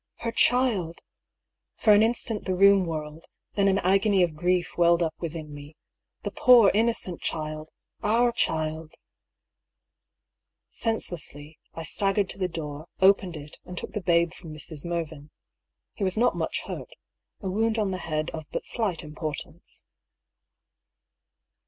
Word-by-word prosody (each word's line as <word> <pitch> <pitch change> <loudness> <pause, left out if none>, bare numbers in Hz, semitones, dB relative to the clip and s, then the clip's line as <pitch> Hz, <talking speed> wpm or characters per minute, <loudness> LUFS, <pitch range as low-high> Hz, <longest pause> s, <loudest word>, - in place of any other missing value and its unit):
Her 230 - -1
child 230 -9 +2 0.7
I - - -15
For 215 - +7
an 205 - +6
instant 225 -1 0
the 185 - 0
room 195 -1 +5
whirled; 155 0 -6 0.3
then 200 -1 +2
an 195 0 +3
agony 195 +1 +3
of 165 -3 -1
grief 180 +2 0
welled 170 0 +4
up 160 -1 -1
within 160 -3 -6
me. 145 +1 -11 0.5
The - - -3
poor, 240 -5 +6
inno 225 +3 +2
cent 180 -3 -1
child! 155 0 -4 0.2
— - - -44 0.2
our 245 0 +4
child! 160 -6 -2 1.8
Senselessly, 160 -9 -3 0.2
I 165 - -5
staggered 195 +4 +1
to - - -4
the 185 - +1
door, 155 -2 -6
opened 190 -3 +4
it, 150 0 -10
and 180 - -9
took - - -5
the 210 - -3
babe 170 -1 +2
from 165 -4 -11
Mrs. 155 -1 -7
Mervyn. 160 -3 -4 0.6
He 205 - -5
was 190 +1 0
not 245 +2 +3
much - - -2
hurt - - -8 0.3
— - - -59
a 190 - -2
wound 220 +3 +1
on 210 -3 0
the 185 - -3
head 155 -1 -2
of 155 -1 -7
but - - -4
slight 205 -9 -1
importance. 150 -1 -7
175 Hz, 155 wpm, -26 LUFS, 155-200 Hz, 1.8 s, For